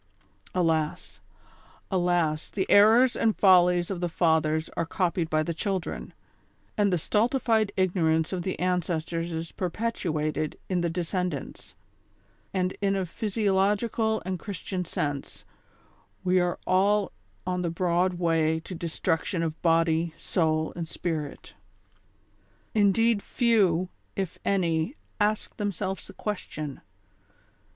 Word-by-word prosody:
Alas! 160 -4 0 0.7
alas! 175 -4 +1
the 190 - -1
errors 225 +5 +6
and 220 -2 +1
follies 180 -2 +5
of 180 -2 -4
the 175 - 0
fathers 160 -2 +2
are - - 0
copied 170 -1 -1
by 155 0 +2
tlie 165 +1 -3
children, 190 0 -3 0.6
and 205 -2 +2
the 180 - +2
stultified 220 - +1
ignorance 165 -3 +2
of 180 - -1
the 185 +2 -2
ances 180 -3 0
tors 165 0 -3
is 165 0 -4
perpetuated 165 -6 -2
in 180 -2 +1
the 170 - 0
descendants, 175 -3 -4 0.8
and 185 -1 -1
in 195 -1 +2
a 190 -1 0
physiologi 205 +1 +1
cal 220 -1 0
and 185 -1 -3
Christian 190 -1 -4
sense, 145 -3 -4 0.8
we 185 0 +3
are 175 0 0
all 200 +2 +3 0.3
on 180 0 -1
the 175 - -1
broad 175 +2 +1
way 165 -2 +1
to 185 - -8
destruction 165 +1 -1
of 160 -1 -4
body, 165 -1 +2
soul 160 -3 0
and 170 -1 -4
spirit. 160 -4 -4 1.2
Indeed 215 +1 +3
few, 195 -9 +2 0.3
if 190 -3 -3
any, 175 - +1 0.2
ask 210 0 0
themselves 195 -2 -3
the - - -11
question. 155 -9 -5
180 Hz, 125 wpm, -27 LUFS, 165-195 Hz, 1.2 s, errors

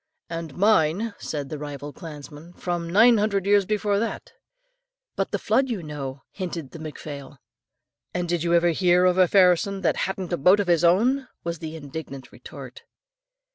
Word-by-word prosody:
"And 165 -4 -5
mine," 200 +1 +2
said 145 -3 -4
the 155 - -5
rival 145 0 -7
clansman, 150 +1 -10
"from 175 -2 -3
nine 225 +5 +6
hundred 200 -2 0
years 200 -1 +3
before 210 -1 +1
that." 230 - -4 0.8
"But - - -1
the - - -1
flood, 265 0 +1
you 210 -8 -3
know?" 140 -3 -6
hinted 170 -7 -5
the 165 - -10
McPhlail. 145 -3 -8 0.7
"And 180 -1 -2
did 175 -1 -1
you 170 +1 +2
ever 170 0 +4
hear 180 +1 +3
of 180 0 +3
a 185 - +6
Phairson 190 +1 +3
that - - +2
hadn't 190 -2 -4
a - - +1
boat 185 +8 +5
of 205 - +1
his 175 -2 +2
own?" 245 +10 +3 0.2
was 170 -1 -4
the 160 0 -6
indignant 140 -2 -8
retort. 470 - -11
175 Hz, 175 wpm, -24 LUFS, 155-195 Hz, 0.8 s, nine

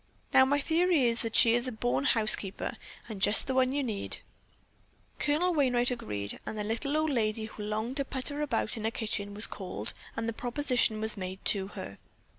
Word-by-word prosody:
Now 260 - +7
my 285 +2 +2
theory 325 -3 +2
is 230 0 +2
that 230 -2 -3
she 230 -2 +7
is 240 +2 0
a - - -2
born 245 +4 -1
housekeeper 215 -5 +2 0.3
and 210 -4 -7
just 205 +3 +5
the 265 - -2
one 260 0 +3
you 285 +1 -1
need." 215 -6 -3 1.0
Colonel 335 +5 +2
Wainright 250 -5 +2
agreed, 105 - -4
and 220 - -6
the 210 - -2
little 235 +8 -1
old 310 -1 +1
lady 220 -3 0
who 215 -1 -9
longed 215 +5 -3
to 275 - 0
putter 280 +3 -4
about 240 -7 -1
a 220 -1 -1
kitchen 210 -3 -3
was 210 - +2
called 190 -3 -6 0.2
and 225 0 -2
the 230 - -2
proposition 245 -2 0
was 220 0 -2
made 185 0 -6
to 195 -2 +3
her. 95 +1 -7
230 Hz, 195 wpm, -30 LUFS, 215-270 Hz, 1.0 s, Now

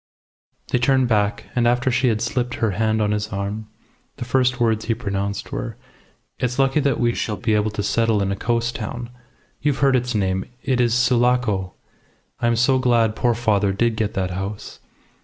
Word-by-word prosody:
They 125 - +1
turned 130 +1 +3
back, 105 -3 0
and 120 -1 +3
after 125 +2 +2
she 125 +1 +2
had 110 -2 +1
slipped 120 +1 -2
her 110 -2 0
hand 110 +2 +1
on 105 - +1
his 105 0 -1
arm, 100 +1 -4 0.5
the 125 - -6
first 125 0 +1
words 110 -2 +1
he 115 - 0
pronounced 100 -3 -3
were - - -4 0.6
"It's 125 0 -1
lucky 135 +2 +3
that 140 -3 +1
we 120 -1 +2
shall 105 -3 -2
be 110 +4 0
able 105 0 +2
to 105 0 -4
settle 115 0 +1
in 95 - -1
a - - -1
coast 120 +3 -1
town. 120 +2 -5 0.5
You've 145 -2 +1
heard 135 -1 +4
its 125 -1 0
name. 95 -2 0 0.2
It 130 -2 +1
is 120 -1 +2
Sulaco. 120 -6 +2 0.7
I 120 - +1
am 120 - +3
so 130 +3 +3
glad 115 -4 +2
poor 120 0 +1
father 105 -4 +1
did 115 +3 +1
get 110 0 -2
that 95 -2 -1
house. 95 +3 -6
115 Hz, 195 wpm, -22 LUFS, 105-125 Hz, 0.7 s, heard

